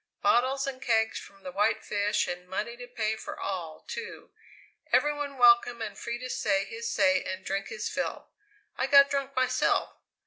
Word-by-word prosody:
Bottles 260 +6 +3
and 265 -2 -5
kegs 220 -2 +1
from 195 -1 -15
the 185 - -6
White 210 +4 +1
Fish 205 0 0
and 180 0 -6
money 215 +5 -3
to 245 0 -10
pay 220 -3 -1
for 220 - -8
all, 170 -5 -5
too! 465 -1 -7 0.6
Every 295 0 +4
one 290 -2 -5
welcome 240 -1 +5
and 220 -2 -5
free 235 0 -4
to 255 +1 -6
say 195 -1 +1
his 230 +1 -5
say 185 -2 +3
and 185 0 -5
drink 195 0 -2
his 220 -2 -4
fill. - - -4 0.5
I 265 - +1
got 280 0 +7
drunk 275 -1 -2
myself! 255 0 +1
230 Hz, 180 wpm, -28 LUFS, 200-255 Hz, 0.6 s, got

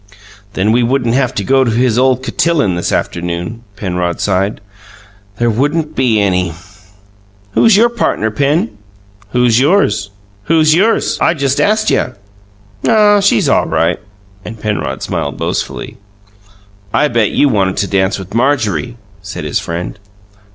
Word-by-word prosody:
"Then 100 +3 +1
we 120 +2 +3
wouldn't 120 -1 0
have 130 -1 +1
to 100 - -1
go 135 +5 +3
to 125 - 0
his 120 +1 +1
ole 130 -1 +3
cotillon 140 - 0
this 85 0 -2
afternoon," 85 +6 -3
Penrod 90 -3 -3
sighed. 95 +1 0 0.8
"There 120 - +1
wouldn't 150 +6 -1
be 120 -5 +2
any!" 90 -4 0 1.0
"Who's 215 - +4
your 230 +3 +5
partner, 215 - -1
Pen?" 140 - 0 0.5
"Who's 120 0 +2
yours?" 130 - +2 0.4
"Who's 155 -1 +3
yours? 205 +7 +1
I 170 - +3
just 140 -2 0
ast 215 +1 +2
you." 125 - 0 0.7
"Oh, 210 -2 +4
she's 195 - +2
all - - +2
right!" - - 0 0.4
And 110 +1 -9
Penrod 105 -11 -3
smiled - - -3
boastfully. - - -4 0.9
"I 150 - +2
bet 115 -5 +1
you 145 - +2
wanted 95 -7 0
to 100 - 0
dance 95 -1 0
with 95 0 -9
Marjorie!" 120 - 0 0.2
said 95 -4 -7
his 75 - -1
friend. 85 +4 -5
115 Hz, 145 wpm, -14 LUFS, 100-145 Hz, 1.0 s, your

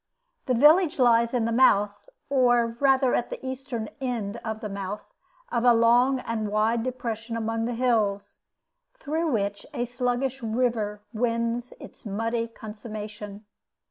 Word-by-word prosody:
This 250 -2 +2
village 315 +5 +5
lies 235 -2 +4
in 245 -3 0
the 230 - 0
mouth, 210 - +3 0.2
or 245 -4 +3
rather 270 -2 +3
at 240 - 0
the - - -7
eastern 260 -4 -4
end 235 -5 -3
of 220 -2 -5
the 220 - -5
mouth, 200 +1 -6 0.4
of 235 - 0
a 240 -1 +6
long 245 +3 +4
and 225 -3 -3
wide 215 +2 +1
depression 230 -2 -4
among 225 0 -1
the 240 0 -2
hills, 220 -5 0 0.6
through 320 +3 -2
which 200 -3 -1
a 240 - -1
sluggish 250 +2 -2
river 220 -3 -1
wins 235 +1 -1
its - - -13
muddy 230 +3 -2
consummation. 210 -2 -8
230 Hz, 140 wpm, -26 LUFS, 215-250 Hz, 0.6 s, a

